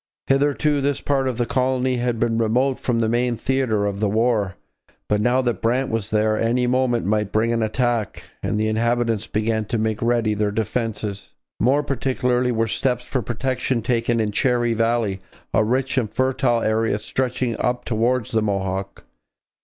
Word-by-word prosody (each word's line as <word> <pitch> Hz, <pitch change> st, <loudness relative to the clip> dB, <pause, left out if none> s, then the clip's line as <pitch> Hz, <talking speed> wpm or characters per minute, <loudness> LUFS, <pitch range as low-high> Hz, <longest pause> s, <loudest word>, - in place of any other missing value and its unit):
Hitherto 145 Hz, +1 st, +2 dB
this 140 Hz, 0 st, 0 dB
part 135 Hz, -2 st, 0 dB
of 125 Hz, -3 st, -2 dB
the 120 Hz, -, +1 dB
colony 130 Hz, 0 st, 0 dB
had 120 Hz, -1 st, -1 dB
been 115 Hz, -1 st, +1 dB
remote 125 Hz, +4 st, +1 dB
from 115 Hz, -2 st, 0 dB
the 110 Hz, -, +2 dB
main 120 Hz, +1 st, 0 dB
theatre 125 Hz, -6 st, 0 dB
of 100 Hz, -1 st, -2 dB
the 105 Hz, -1 st, +1 dB
war, 110 Hz, -3 st, +1 dB, 0.5 s
but 105 Hz, 0 st, +1 dB
now 125 Hz, +3 st, +2 dB
that 120 Hz, -2 st, -1 dB
Brant 125 Hz, +3 st, +1 dB
was 110 Hz, -2 st, -2 dB
there 110 Hz, 0 st, +1 dB
any 120 Hz, +2 st, +1 dB
moment 125 Hz, -2 st, +1 dB
might 105 Hz, 0 st, 0 dB
bring 115 Hz, +2 st, +1 dB
an 115 Hz, -, 0 dB
attack, 115 Hz, 0 st, -1 dB, 0.2 s
and 105 Hz, -, -1 dB
the 110 Hz, -, +1 dB
inhabitants 115 Hz, 0 st, 0 dB
began 110 Hz, 0 st, -1 dB
to 115 Hz, -, -2 dB
make 110 Hz, -1 st, -1 dB
ready 115 Hz, -2 st, +1 dB
their 105 Hz, 0 st, 0 dB
defences. 105 Hz, -1 st, -3 dB, 0.2 s
More 135 Hz, +6 st, +3 dB
particularly 125 Hz, -2 st, 0 dB
were 115 Hz, -1 st, +1 dB
steps 125 Hz, +2 st, -1 dB
for 130 Hz, -, -2 dB
protection 125 Hz, +1 st, -2 dB
taken 115 Hz, 0 st, +1 dB
in 110 Hz, -2 st, 0 dB
Cherry 120 Hz, +1 st, +1 dB
Valley, 115 Hz, -4 st, 0 dB, 0.3 s
a 110 Hz, -, +4 dB
rich 130 Hz, +4 st, +1 dB
and 110 Hz, -4 st, -3 dB
fertile 130 Hz, -2 st, +1 dB
area 110 Hz, -1 st, +1 dB
stretching 125 Hz, +2 st, -2 dB
up 125 Hz, 0 st, -1 dB
towards 120 Hz, +1 st, 0 dB
the 110 Hz, -, +2 dB
Mohawk. 95 Hz, -1 st, -3 dB
115 Hz, 175 wpm, -22 LUFS, 110-125 Hz, 0.5 s, a